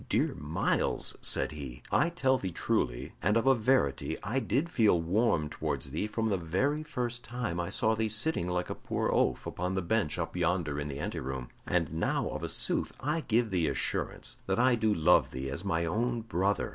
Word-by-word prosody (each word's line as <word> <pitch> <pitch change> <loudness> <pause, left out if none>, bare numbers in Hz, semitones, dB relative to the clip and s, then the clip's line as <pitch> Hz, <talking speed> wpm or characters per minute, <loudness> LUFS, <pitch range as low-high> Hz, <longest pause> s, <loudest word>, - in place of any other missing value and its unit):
"Dear - - +2
Myles," 75 +3 0
said - - +3
he, 70 -5 -8
"I 170 - +3
tell 135 -7 +1
thee 95 - -3
truly - - -1
and 105 +6 +3
of 115 - +1
a 135 - +7
verity 115 - +1
I 110 +8 0
did 135 +6 0
feel 110 - +3
warm 85 -2 +1
towards 70 - -3
thee 80 +8 -1
from 110 +1 -1
the 100 -3 0
very 115 - 0
first 125 -5 -3
time 120 -8 -3
I 85 - -2
saw 110 -2 +2
thee 110 0 0
sitting 110 - +1
like 90 0 -1
a - - 0
poor - - -2
oaf - - +1
upon 90 +2 -3
the 95 - 0
bench 100 -4 0
up - - -3
yonder 80 -5 0
in 75 - -3
the 70 -2 -5
anteroom, 65 -3 -4 0.2
and 85 -4 0
now 80 - 0
of - - -5
a - - -2
sooth - - +1
I 150 +5 -1
give 115 -4 +1
thee 85 -4 +1
assurance - - -2
that - - +1
I 125 +1 +4
do 110 -2 +2
love 90 -2 +4
thee 65 +1 -5
as 70 +7 -1
my 85 -4 0
own 115 +7 0
brother. 100 -2 0
100 Hz, 205 wpm, -30 LUFS, 80-120 Hz, 0.2 s, a